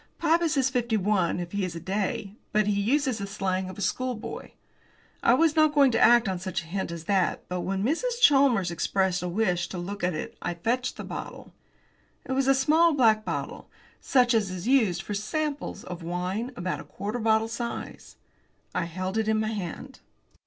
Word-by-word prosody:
Pybus 330 -2 +2
is 265 -1 +2
fifty 240 -3 0
five, 190 -4 +1
if 175 -1 -5
he 200 -1 -1
is 180 -2 -3
a - - -4
day, 200 +3 -3 0.2
but 215 0 +3
he 200 -1 +1
uses 260 +1 +1
the 200 - -4
slang 190 -2 -2
of 185 - -9
a - - -6
schoolboy. 250 +2 -3 0.7
I 235 - +5
was 320 +2 +3
not 310 -1 +4
going 280 -3 +6
to 225 - +1
act 235 -1 +6
on 185 -2 -2
such 185 -2 -3
a - - -14
hint 190 +3 -3
as 170 -1 -6
that, 195 0 0
but 180 0 -3
when 195 +1 -2
Mrs. 470 - 0
Chalmers 270 - +4
expressed 190 +1 0
a 180 - -3
wish 180 -3 0
to 185 - -7
look 195 +3 -5
at 180 -2 +1
it - - -5
I 175 - -3
fetched 245 +8 -1
the - - -6
bottle. - - -8 0.7
It - - -6
was 265 0 +1
a 270 - +5
small 315 +5 +4
black 220 -5 +4
bottle, - - -5 0.3
such 250 -2 +3
as 215 -4 +2
is 185 +2 -5
used 220 -10 +3
for 210 - -5
"samples" 285 +8 -3
of 180 -1 -7
wines, 180 +7 -3
about 180 +1 -4
quarter 210 +5 -4
bottle 220 0 +2
size. 235 +1 -6 0.6
I 170 - -1
held 185 +5 -3
it 220 - -1
in 220 0 +2
my 215 0 0
hand. 215 +6 -6
215 Hz, 200 wpm, -27 LUFS, 185-255 Hz, 0.7 s, going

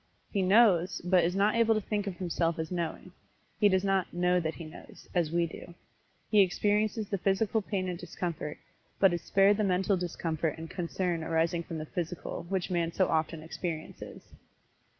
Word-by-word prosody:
He 200 - 0
"knows," 190 -2 +4
but 180 -1 +4
is 175 +2 0
not 200 +2 +3
able 230 -1 +3
to - - +2
think 205 0 -2
of 185 -3 -4
himself 170 -2 -1
as 160 +1 -4
knowing 175 +1 -4 0.5
he 210 -1 +5
does 190 0 +2
not 195 -2 +1
"know 180 +1 +2
that 160 -2 -2
he 170 - -8
knows," 155 - -12
as 170 -4 +1
we 170 0 +2
do. 170 +1 -10 0.6
He 210 -2 +7
experiences 210 +3 +1
the 200 - -1
physical 200 +4 +1
pain 190 -2 -2
and 175 -2 -4
discomfort, 170 -3 -5 0.4
but 195 -3 +5
is 170 - -2
spared 195 +3 +4
the 215 - +1
mental 190 +1 +2
discomfort 165 -3 -2
and 160 0 -8
concern 175 -1 -2
arising 165 +1 +1
from 165 -1 -6
the 155 - -5
physical, 170 +1 -5
which 190 -1 -1
man 170 -2 0
so 185 +2 +1
often 160 0 -1
experiences. 160 0 -6
180 Hz, 185 wpm, -30 LUFS, 165-195 Hz, 0.6 s, He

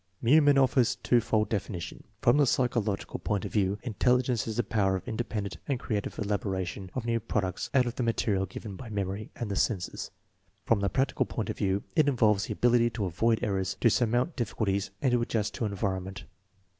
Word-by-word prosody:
Meumann 145 +3 +5
offers 130 -2 +3
u - - -34
twofold 115 -3 +2
definition. 90 -4 -4 0.2
From 120 +4 +5
the 145 -2 +4
psy 125 +2 +3
chological 105 -5 -3
point 105 -3 -1
of - - -6
view, 100 -1 +1
intelligence 125 0 +1
is 110 - -3
the 120 - +2
power 95 -3 +1
of 95 - -5
in - - -3
dependent 105 -4 -3
and 135 -3 0
creative 105 -6 -3
elaboration 100 -3 -2
of 130 -3 -3
new 115 0 +1
products 100 -4 -2
out 130 -2 +5
of 120 - -4
the - - -1
material 105 -4 0
given 100 +2 -8
by 120 +3 -9
memory 100 0 -3
and 115 -4 -4
the - - -1
senses* 95 -3 -1 0.6
From 115 - +3
the 100 0 0
practical 135 +8 0
point - - -3
of - - -8
view, 95 +1 0
it 155 -3 +4
involves 110 -6 +3
the - - -2
ability 120 -1 +3
to 110 -3 -3
avoid 110 +6 +1
errors, 95 -3 -1
to - - +5
surmount 120 +7 +1
difficulties, 105 -5 -1
and 130 - +3
to 120 -1 +2
adjust 110 -3 -1
to 115 - -2
environ 95 -2 -2
ment. 95 +1 -8
110 Hz, 205 wpm, -29 LUFS, 100-120 Hz, 0.6 s, Meumann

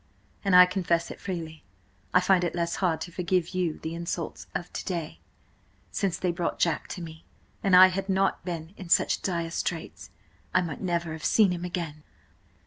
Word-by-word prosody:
And, 195 -3 +3
I 180 0 +11
confess 175 -2 0
it - - -9
freely, 165 -5 -5 0.5
I 180 - +5
find 185 -1 +3
it 175 - -1
less 170 -1 -1
hard 175 -4 0
to 175 - -5
forgive 180 -1 0
you 180 -4 -1
the 160 - -5
insults 170 -1 -4
of–of 175 - -4
to - - -4
day, 170 -4 -4 0.7
since 190 -5 -1
they 180 -1 0
brought–Jack–to 170 0 -1
me. 160 -1 -10 0.4
An 195 -2 +4
I 185 +1 +10
had 195 +1 -4
not 195 0 +1
been 170 -1 -5
in 185 -3 -9
such - - +3
dire 170 -3 -2
straits, 165 - -4 0.5
I - - +6
might 165 -5 -5
never 170 -3 -1
have 160 0 -7
seen 210 -4 +4
him 175 -1 -3
again." 170 -4 -4
175 Hz, 180 wpm, -27 LUFS, 165-185 Hz, 0.7 s, I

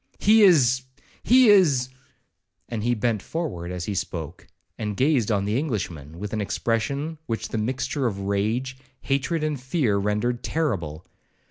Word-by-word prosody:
—He 220 +2 +5
is—he 140 - +3
is—' 150 -11 +5 0.8
and 115 -3 -4
he 120 +1 +1
bent 110 -2 0
forwards 95 - -4
as 90 -1 -4
he 105 - -3
spoke, 85 -3 -5 0.3
and 105 -3 -4
gazed 130 -5 +2
on 100 -2 +1
the 105 +5 0
Englishman 85 - -4
with 105 +3 -6
an 110 - -1
expression 140 +9 -2
which 115 -1 -3
the 110 - -2
mixture 130 +4 -1
of 100 -3 -4
rage, 110 +7 -1 0.2
hatred, 140 +4 -1
and 150 -4 -2
fear, 130 - +1
rendered 105 +4 -1
terrible. 95 - -2
120 Hz, 145 wpm, -24 LUFS, 100-140 Hz, 0.8 s, He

